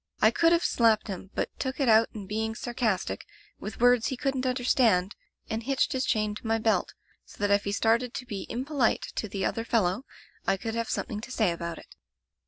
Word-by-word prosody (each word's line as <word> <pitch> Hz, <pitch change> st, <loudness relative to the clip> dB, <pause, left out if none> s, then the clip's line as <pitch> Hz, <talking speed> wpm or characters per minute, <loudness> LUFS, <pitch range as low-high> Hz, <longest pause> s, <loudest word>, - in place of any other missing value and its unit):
I 220 Hz, -, +5 dB
could 330 Hz, +7 st, +3 dB
have 340 Hz, 0 st, +3 dB
slapped 225 Hz, -2 st, +3 dB
him, 190 Hz, 0 st, -6 dB
but -, -, -1 dB
took 260 Hz, +1 st, -3 dB
it 275 Hz, -, +2 dB
out 225 Hz, 0 st, +5 dB
in 205 Hz, -2 st, -6 dB
being 220 Hz, +2 st, -2 dB
sarcastic, 235 Hz, -4 st, -1 dB, 0.4 s
with 215 Hz, -, -7 dB
words 245 Hz, -1 st, +4 dB
he 260 Hz, -, -3 dB
couldn't 265 Hz, -1 st, -1 dB
under 250 Hz, 0 st, -1 dB
stand, 215 Hz, -7 st, +3 dB, 0.3 s
and 220 Hz, 0 st, -2 dB
hitched 270 Hz, +3 st, +1 dB
his 260 Hz, 0 st, 0 dB
chain 215 Hz, -3 st, +1 dB
to 220 Hz, +2 st, -8 dB
my 225 Hz, 0 st, +2 dB
belt, 220 Hz, -4 st, +1 dB, 0.3 s
so -, -, -17 dB
that 205 Hz, 0 st, +2 dB
if 200 Hz, 0 st, +2 dB
he 200 Hz, -, -1 dB
started 230 Hz, +4 st, +1 dB
to 250 Hz, -, -4 dB
be 200 Hz, -5 st, -6 dB
impolite 260 Hz, -1 st, 0 dB
to 215 Hz, -, -2 dB
the 195 Hz, -1 st, -2 dB
other 225 Hz, -, -1 dB
fellow, 215 Hz, 0 st, +1 dB, 0.4 s
I 195 Hz, -, +3 dB
could 225 Hz, +3 st, -4 dB
have 230 Hz, 0 st, -2 dB
something 210 Hz, -1 st, -3 dB
to 235 Hz, -, -9 dB
say 220 Hz, -7 st, +1 dB
about 170 Hz, 0 st, -4 dB
it. -, -, -14 dB
225 Hz, 215 wpm, -28 LUFS, 205-250 Hz, 0.4 s, I